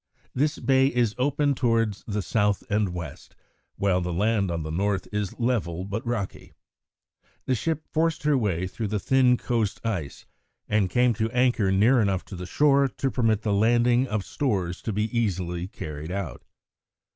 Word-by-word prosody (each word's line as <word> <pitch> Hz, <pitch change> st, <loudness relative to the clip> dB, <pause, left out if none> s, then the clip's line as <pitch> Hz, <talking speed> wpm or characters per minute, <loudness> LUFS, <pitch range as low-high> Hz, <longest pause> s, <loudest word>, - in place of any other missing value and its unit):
This 150 Hz, +4 st, 0 dB
bay 135 Hz, 0 st, +3 dB
is 120 Hz, -5 st, +1 dB
open 145 Hz, +2 st, +2 dB
towards 115 Hz, -5 st, 0 dB
the 105 Hz, -2 st, -2 dB
south 105 Hz, +3 st, +1 dB
and 105 Hz, -1 st, +2 dB
west, 85 Hz, -5 st, -8 dB, 0.4 s
while 95 Hz, -2 st, +1 dB
the 90 Hz, 0 st, -3 dB
land 100 Hz, +2 st, +1 dB
on 85 Hz, -2 st, -2 dB
the 80 Hz, -, -5 dB
north 100 Hz, +3 st, -1 dB
is 105 Hz, -2 st, -2 dB
level 95 Hz, -8 st, -1 dB
but 100 Hz, +3 st, -4 dB
rocky. 115 Hz, -5 st, -4 dB, 0.9 s
The 130 Hz, -, +1 dB
ship 155 Hz, +5 st, -2 dB
forced 160 Hz, 0 st, 0 dB
her 150 Hz, -1 st, +3 dB
way 95 Hz, -8 st, 0 dB
through 105 Hz, +4 st, -4 dB
the 105 Hz, +1 st, -1 dB
thin 125 Hz, +3 st, +3 dB
coast 115 Hz, -5 st, -1 dB
ice 90 Hz, -11 st, -3 dB, 0.4 s
and 105 Hz, -3 st, +1 dB
came 125 Hz, +2 st, +3 dB
to 110 Hz, +1 st, -1 dB
anchor 120 Hz, -5 st, +2 dB
near 115 Hz, +6 st, +4 dB
enough 95 Hz, -3 st, 0 dB
to 100 Hz, -, -9 dB
the 90 Hz, 0 st, -6 dB
shore 140 Hz, +5 st, +3 dB
to 135 Hz, +1 st, -3 dB
permit 110 Hz, -4 st, +1 dB
the 105 Hz, -, +1 dB
landing 120 Hz, +4 st, +3 dB
of 105 Hz, -4 st, -2 dB
stores 95 Hz, -, -2 dB
to 110 Hz, -, -3 dB
be 105 Hz, +1 st, 0 dB
easily 90 Hz, -6 st, -1 dB
carried 75 Hz, -4 st, -7 dB
out. 95 Hz, -2 st, -5 dB
105 Hz, 170 wpm, -25 LUFS, 95-125 Hz, 0.9 s, near